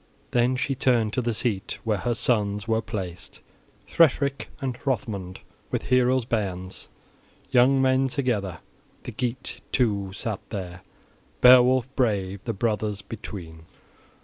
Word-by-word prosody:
Then 125 Hz, +1 st, +2 dB
she 135 Hz, +2 st, -1 dB
turned 120 Hz, -5 st, +2 dB
to 130 Hz, -, 0 dB
the 120 Hz, 0 st, -1 dB
seat 105 Hz, -5 st, -2 dB
where 110 Hz, -3 st, 0 dB
her 120 Hz, +2 st, -1 dB
sons 105 Hz, -3 st, 0 dB
wereplaced, 105 Hz, -6 st, -3 dB, 0.5 s
Hrethric 140 Hz, -3 st, +2 dB
and 135 Hz, -4 st, -2 dB
Hrothmund, 100 Hz, -8 st, -3 dB, 0.3 s
with -, -, -2 dB
heroes' 125 Hz, -1 st, +2 dB
bairns, 95 Hz, -5 st, -3 dB, 0.6 s
young 130 Hz, +2 st, +5 dB
men 130 Hz, 0 st, +3 dB
together: 120 Hz, -, -2 dB, 0.4 s
the -, -, -6 dB
Geat, 125 Hz, +1 st, -4 dB
too, 100 Hz, -6 st, +1 dB
sat 105 Hz, +1 st, -4 dB
there, 95 Hz, -3 st, -6 dB, 0.6 s
Beowulf 125 Hz, 0 st, +7 dB
brave, 100 Hz, -6 st, 0 dB
the 115 Hz, -, -1 dB
brothers 105 Hz, -1 st, -1 dB
between. 85 Hz, -7 st, -9 dB
115 Hz, 120 wpm, -25 LUFS, 100-125 Hz, 0.6 s, Beowulf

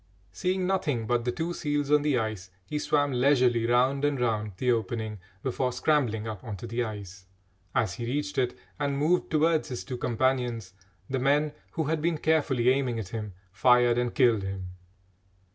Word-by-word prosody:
Seeing 185 Hz, 0 st, -1 dB
nothing 150 Hz, -11 st, 0 dB
but 120 Hz, +1 st, 0 dB
the 125 Hz, -, +1 dB
two 170 Hz, +5 st, -3 dB
seals 145 Hz, -3 st, -1 dB
on 150 Hz, 0 st, +5 dB
the 145 Hz, -3 st, +2 dB
ice, 110 Hz, -5 st, -3 dB, 0.2 s
he 150 Hz, +10 st, -3 dB
swam 145 Hz, -1 st, +1 dB
leisurely 125 Hz, -3 st, +3 dB
round 130 Hz, +3 st, +2 dB
and 145 Hz, -2 st, +1 dB
round 110 Hz, -4 st, 0 dB
the 125 Hz, +3 st, +2 dB
opening 110 Hz, -2 st, -2 dB, 0.2 s
before 130 Hz, 0 st, 0 dB
scrambling 125 Hz, -5 st, +1 dB
up 105 Hz, -4 st, -6 dB
on 110 Hz, -4 st, -5 dB
to 95 Hz, -, -8 dB
the 115 Hz, +2 st, -1 dB
ice. 100 Hz, -4 st, -8 dB, 0.5 s
As 100 Hz, -6 st, +1 dB
he 115 Hz, +5 st, -5 dB
reached 145 Hz, +2 st, -1 dB
it 125 Hz, -1 st, 0 dB, 0.2 s
and 140 Hz, -1 st, 0 dB
moved 165 Hz, +5 st, +2 dB
towards 160 Hz, 0 st, +2 dB
his 125 Hz, -, -4 dB
two 130 Hz, -2 st, -5 dB
companions, 120 Hz, -4 st, -1 dB, 0.3 s
the 130 Hz, -, -1 dB
men, 145 Hz, +3 st, +2 dB, 0.2 s
who 160 Hz, -, -1 dB
had 155 Hz, +1 st, -1 dB
been 165 Hz, 0 st, +1 dB
carefully 145 Hz, -6 st, +2 dB
aiming 130 Hz, -3 st, +1 dB
at 105 Hz, -5 st, -5 dB
him, 105 Hz, -2 st, -5 dB, 0.2 s
fired 120 Hz, +4 st, +4 dB
and 120 Hz, -1 st, -1 dB
killed 120 Hz, -6 st, +4 dB
him. 95 Hz, -1 st, -5 dB
125 Hz, 180 wpm, -28 LUFS, 115-145 Hz, 0.5 s, on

